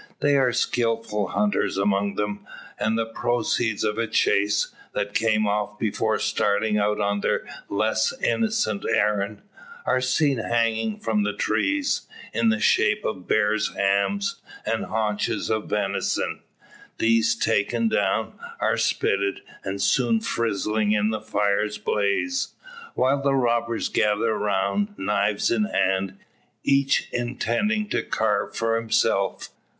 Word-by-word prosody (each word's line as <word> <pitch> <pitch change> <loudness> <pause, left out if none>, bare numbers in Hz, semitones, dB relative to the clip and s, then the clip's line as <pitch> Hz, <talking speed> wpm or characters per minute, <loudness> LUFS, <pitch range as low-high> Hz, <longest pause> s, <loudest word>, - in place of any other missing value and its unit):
There 140 -2 +3
are - - +2
skilful 115 -3 0
hunters 105 +1 0
among 100 0 +1
them, 105 0 -3 0.4
and 110 +1 +1
the 115 - 0
proceeds 115 -1 -1
of 105 0 -1
a 115 - 0
chase, 105 -1 +1 0.2
that 100 0 -2
came 110 -1 +2
off 105 0 -1
before 110 0 0
starting 105 0 +1
out 105 +1 +1
on 100 0 0
their - - 0 0.2
less 110 +2 +1
innocent 215 - 0
errand, 105 -1 0 0.4
are 130 - +2
seen 135 +1 +2
hanging 115 -1 0
from 110 -2 0
the 105 0 0
trees, 285 - 0 0.3
in 230 - +2
the 220 +1 +1
shape 210 0 +2
of 95 -4 -4
bear's 110 0 +1
hams 100 - 0 0.2
and 110 +1 -1
haunches 105 -1 -1
of 110 -1 -1
venison. 100 -2 -1 0.6
These 115 0 +3
taken 115 +3 +1
down, 105 +1 0 0.3
are - - +1
spitted, 100 0 0 0.2
and 100 0 -4
soon 120 -1 +2
frizzling 105 -1 0
in 105 +1 +1
the 110 -1 -3
fire's 105 0 0
blaze; 105 - -1 0.4
while 140 +2 +2
the 140 0 +2
robbers 120 -2 +1
gather 105 +2 +1
around, 105 - -1
knives 105 0 +1
in 110 -2 +2
hand, 95 -1 0 0.5
each 140 0 +2
intending 125 - -1
to - - 0
carve 105 -2 -1
for 115 0 +1
himself. 100 -4 0
110 Hz, 130 wpm, -24 LUFS, 105-115 Hz, 0.6 s, There